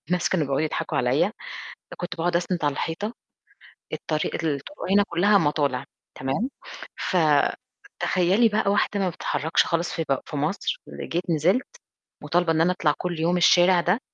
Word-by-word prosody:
الناس 180 0 +1
كانوا 175 -5 +1
بيقعُدوا 135 0 0
يضحكوا 155 - -2
عليّا، - - +2 0.7
كنت 175 0 -5
باقعُد 170 +1 0
أسنِد 175 -1 -1
على 145 - +1
الحيطة، 205 +10 -3 0.8
الطريق 155 -1 -2
الطُرُق 155 - -3
هنا 205 +1 +6
كُلّها 200 +4 +4
مَطالِع، 145 -6 0 0.3
تمام، 135 - -2 0.6
فتخيّلي 180 +5 +1
بقى 210 -1 +1
واحدة 205 0 +1
ما 190 -2 +1
بتتحّركش 160 -1 0
خالص 170 +1 -1
في 165 - -2
ب 135 - +3
في - - -7
مصر، 155 - -2 0.2
ر - - -4
جيت 175 +2 -3
نزلْت 175 - +2 0.6
مُطالبة 175 -1 +1
إن 160 0 +2
أنا 175 - +4
أطلع 155 -5 +1
كل 175 -2 -4
يوم 170 +2 +2
الشارع 175 +1 +5
ده، 180 +6 +1
175 Hz, 155 wpm, -24 LUFS, 155-185 Hz, 0.8 s, هنا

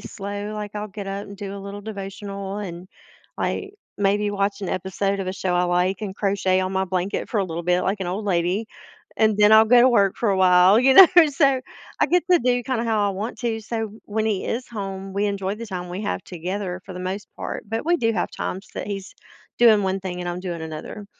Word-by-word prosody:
slow, 205 0 -6
like, 210 -1 -5
I'll 210 0 -4
get 200 0 -7
up 200 +1 -4
and 200 - -10
do 200 -1 -6
a - - -6
little 200 +1 -7
devotional 200 -1 -6
and, 180 -3 -7 0.5
like, 395 0 -2 0.3
maybe 205 +1 +1
watch 200 0 -1
an 190 - -3
episode 195 +2 -1
of 185 - -4
a 185 - -2
show 185 -2 -2
I 180 0 +2
like 180 +3 0
and 195 -3 -4
crochet 195 -2 +1
on 185 0 -2
my 190 0 +1
blanket 185 +1 -2
for 220 - 0
a - - 0
little 170 -1 -5
bit 180 +1 +2
like 195 +2 -1
an 185 - -2
old 205 +4 -3
lady, 180 +4 0 0.5
and 215 -2 +3
then 210 0 +6
I'll 220 0 +8
go 245 +2 +6
to 255 - +6
work 200 -6 +3
for 230 - 0
a 195 - +1
while, 185 +2 +6
you 265 +1 +5
know, 380 +2 +11 0.2
so 275 -2 +2 0.4
I - - +5
get 360 0 +3
to 355 - +7
do 245 -1 +2
kinda 245 -3 -2
how 215 -3 +1
I - - 0
want 210 +5 -5
to, 230 -2 -1
so 225 -1 -4
when 215 +1 -2
he 205 -4 -1
is 245 +2 -3
home, 195 -3 -6
we 205 +1 +1
enjoy 200 0 -2
the 230 - -7
time 180 -3 -5
we 180 +4 -5
have 205 - -2
together 180 +1 -4
for 190 - -9
the 180 - -6
most 190 +2 -4
part, - - -5
but 225 +4 -3
we 345 +1 +4
do 230 -7 +1
have 180 - -1
times 190 +2 -5
that - - -4
he's 195 -2 -6 0.4
doing 220 -3 +6
one 190 0 -1
thing 180 -1 -5
and 175 - -4
I'm 175 +1 -4
doing 170 -3 -5
another. 160 +6 -7
200 Hz, 240 wpm, -23 LUFS, 185-215 Hz, 0.5 s, know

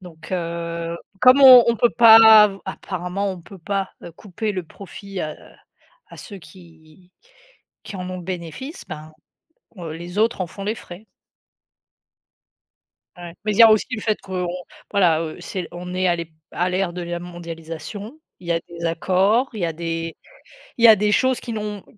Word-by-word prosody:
donc 170 -1 -12
heu, 170 -1 -4 0.2
comme 255 +2 +6
on 255 -2 +10
on 235 - +2
peut 240 - +3
pas 230 -2 +8 0.3
av 195 -1 -2
apparemment 190 +1 -4
on 185 -2 -8
peut 195 +3 -14
pas, 195 +2 -3
heu, 170 - -9
couper 210 +4 -5
le 185 -3 -4
profit 195 +2 -10
à 155 0 -4 0.7
à - - -13
ceux 200 -4 -10
qui 170 0 -18 0.7
qui - - -9
en 180 0 -6
ont 185 - -5
le 180 - -9
bénéfice 185 - -7
ben, 155 +1 -9 0.7
heu, 165 -3 -6
les 175 +4 -8
autres 225 -2 +1
en - - -3
font 195 - -9
les 215 +2 -1
frais. 195 -1 -12 2.1
Ouais, 175 -1 -9
mais 215 - -1
il - - -5
y 230 - +9
a 225 - +8
aussi 215 -1 +3
le 225 - -4
fait 215 -1 -1
qu'on, 180 -2 -4 0.4
voilà, 170 -5 +3
heu, 160 -1 -6
c'est 185 -3 -5
on 180 +1 -8
est 185 0 0
à 175 - +2
l'ép 170 -1 -6 0.2
à 180 +1 -1
l'ère 185 -1 -1
de 180 - -6
la 175 0 -5
mondialisation, 175 - -9 0.2
il 175 - -14
y - - 0
a 165 - +1
des 170 0 -7
accords, 190 +9 +1
il 215 - -7
y - - +1
a 165 - -3
des 165 0 -4 0.6
il 235 - +4
y - - +10
a 220 - +9
des 210 +1 0
choses 260 +2 +2
qui 235 - -7
n'ont 210 -2 -5
180 Hz, 190 wpm, -21 LUFS, 170-210 Hz, 2.1 s, on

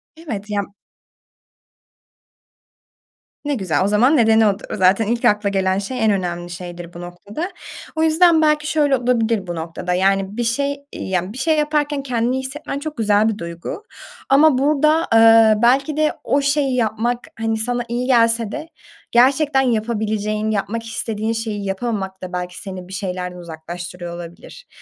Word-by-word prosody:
Evet. 225 -11 -7
Ya 205 -1 0 2.8
ne 290 -1 0
güzel. 185 - 0
O - - +1
zaman 240 +9 +4
nedeni 220 -2 +5
o 200 0 0
dı - - -16
zaten 195 +3 +3
ilk 235 +1 -1
akla 210 -1 +3
gelen 190 -1 0
şey, 225 +5 -3
en 215 - +4
önemli 175 -3 -2
şeydir 175 -1 -8
bu 175 - -9
noktada. 200 - -6 0.5
O 320 - +1
yüzden 320 +1 +5
belki 300 -1 +2
şöyle 290 -3 +2
olabilir 230 -5 0
bu 175 - -4
noktada: 165 +2 -4
Yani, 195 +2 +1
bir 240 - 0
şey, 280 +4 -1
iii, - - -6
yani, 185 +1 -1
bir - - -9
şey 310 +4 +1
yaparken 295 -1 0
kendini 245 -1 0
iyi 265 - -1
hissetmen 280 +1 -5
çok 300 0 -6
güzel 210 -1 +3
bir 215 - -3
duygu 170 - -7 0.5
ama 280 0 +5
burada, 305 +4 +2
ııı, 225 -1 +6
belki 275 +5 +3
de 310 0 +2
o 280 - +1
şeyi 280 -1 +1
yapmak, 235 +1 0 0.2
hani, 225 0 0
sana 240 +2 -1
iyi 245 +2 -2
gelse 230 -3 +3
de 310 +5 -6 0.4
gerçekten 270 +3 +4
yapabileceğin, 215 -3 -1
yapmak 220 +2 -2
istediğin 225 -1 -3
şeyi 220 -3 -4
yapamamak 195 -1 -3
da 180 -1 -7
belki 180 0 -5
seni 185 -4 -8
bir 190 - -11
şeylerden 180 -2 -4
uzaklaştırıyor 175 +1 -8
olabilir. 170 0 -11
225 Hz, 160 wpm, -20 LUFS, 190-270 Hz, 2.8 s, ııı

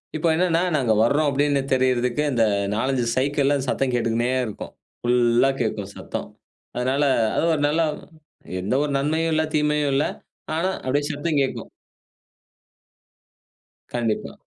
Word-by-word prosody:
இப்போ 155 +2 0
என்னன்னா, 170 -1 +2
நாங்க 125 -6 +2
வர்றோம் 145 +6 +2
அப்படின்னு 140 0 +1
தெரியறதுக்கு 130 +1 +1
இந்த 120 -3 +2 0.3
நாலஞ்சு 130 +2 0
சைக்கிள்ல 140 +1 +1
சத்தம் 130 0 0
கேட்டுக்கினே 120 0 0 0.2
இருக்கும். 110 - -8 0.3
புல்லா 120 +1 +3
கேட்கும் 105 -3 -3
சத்தம். - - -6 0.5
அதனால 130 +4 0 0.3
அது - - +1
ஒரு 150 - -1
நல்ல 155 +3 +1 0.8
எந்த 100 +7 -1
ஒரு 150 - -2
நன்மையும் 160 +3 0
இல்ல, 155 0 +2
தீமையும் 150 -1 +1
இல்ல. 140 - +2 0.5
ஆனா 170 +4 0 0.2
அப்படியே 145 +3 0
சத்தம் 145 +1 -1
கேட்கும். 135 - -3 2.2
கண்டிப்பா. 115 -3 -2
135 Hz, 125 wpm, -23 LUFS, 120-150 Hz, 2.2 s, புல்லா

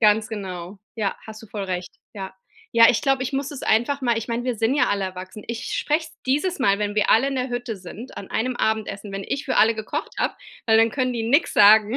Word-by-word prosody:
Ganz 215 0 +4
genau. 190 -3 -6 0.2
Ja, 205 -3 -1
hast 220 0 -10
du - - -11
voll 200 -1 -5
recht. 180 -1 -4 0.2
Ja. 190 -2 -7 0.4
Ja, 230 0 +8
ich 225 - 0
glaub, 270 -2 +1
ich 260 - -3
muss 275 0 -2
es 290 - -8
einfach 260 +5 +1
mal 235 -2 +2
ich 225 - -6
mein, 235 +1 -2
wir 250 -1 0
sind 225 +5 +1
ja 290 - +3
alle 200 -1 0
erwachsen. 185 +2 -7
Ich 235 +1 -4
sprech's 315 +1 -1
dieses 295 +8 +1
Mal, 200 -6 +3
wenn 205 0 -2
wir 210 - +2
alle 265 +5 +5
in 275 - -3
der 255 0 -1
Hütte 245 -2 -4
sind, 210 +7 -10
an 195 - -8
einem 245 +2 -1
Abendessen, 210 -2 -1
wenn 195 0 -5
ich 280 +2 -3
für - - 0
alle 225 +1 +5
gekocht 220 0 -4
habe, - - 0 0.3
weil 220 - +5
dann 225 +1 +5
können 255 0 -1
die 230 - -2
nix 285 +8 +3
sagen 215 +3 +6
225 Hz, 245 wpm, -23 LUFS, 205-255 Hz, 0.4 s, Ja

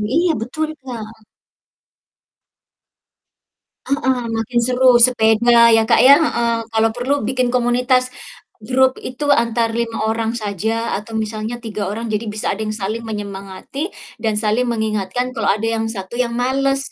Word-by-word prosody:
iya 345 +1 +3
betul, 310 +7 -3
Kak. 225 -4 -9 2.6
Heeh, 260 -2 0 0.2
makin 225 +2 0
seru, 250 -1 +4
sepeda 235 -1 +5
ya, 225 -1 +4
Kak, 225 - +4
ya, 275 +3 +8
heeh, 235 -7 0 0.2
kalau 225 0 +3
perlu 250 +5 -1
bikin 250 +2 -1
komunitas 250 +1 +2 0.5
grup 260 +4 +2
itu 260 +3 -5
antar 230 -2 0
5 230 -1 -2
orang 225 +1 -1
saja 220 +2 -2
atau 220 +2 -6
misalnya 220 +2 -3
3 210 -4 -5
orang, 225 +3 -4
jadi 215 0 -3
bisa 210 0 -2
ada 205 - -6
yang 215 0 -2
saling 215 +3 -3
menyemangati 205 - -6 0.3
dan 220 -2 0
saling 220 +4 +1
mengingatkan 220 +2 -2
kalau 225 -3 -1
ada 215 +2 0 0.2
yang 225 - -1
1 195 -2 -5
yang 240 -1 -1
males. 270 +2 +1
230 Hz, 140 wpm, -19 LUFS, 220-250 Hz, 2.6 s, ya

